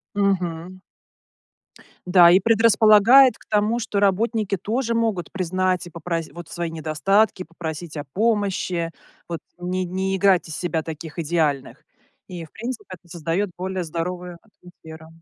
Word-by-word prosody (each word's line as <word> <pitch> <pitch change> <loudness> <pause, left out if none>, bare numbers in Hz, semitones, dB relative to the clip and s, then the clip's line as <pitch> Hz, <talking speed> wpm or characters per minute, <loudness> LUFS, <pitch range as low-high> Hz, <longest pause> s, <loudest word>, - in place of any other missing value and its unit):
Мгм. 185 -3 -1 1.3
Да 180 -1 +7
и 185 - +6
предрасполагает 225 +3 +6
к - - -21
тому, 215 +3 +1
что 210 -3 -2
работники 205 0 +1
тоже 230 +5 -2
могут 220 -7 -1
признать 185 -1 -1
и 175 - -10
попрос 165 -1 -4
вот, 175 -2 -10
свои 170 -1 -4
недостатки, 185 +6 +1
попросить 165 -1 -7
о 145 - -4
помощи, 190 -2 -1 0.4
вот, 170 -1 -4 0.2
не 185 +1 -2
не 190 +2 -2
играть 190 -2 +3
из 160 - -6
себя 170 -3 -2
таких 160 0 -8
идеальных. 150 -4 -1 0.4
И, 175 -3 -7
в - - -21
принципе, 235 +1 -6
это 180 -2 -11
создаёт 170 +4 -2
более 185 0 -3
здоровую 175 +2 -5
атмосферу. 160 -6 -15
180 Hz, 140 wpm, -22 LUFS, 165-205 Hz, 1.3 s, Да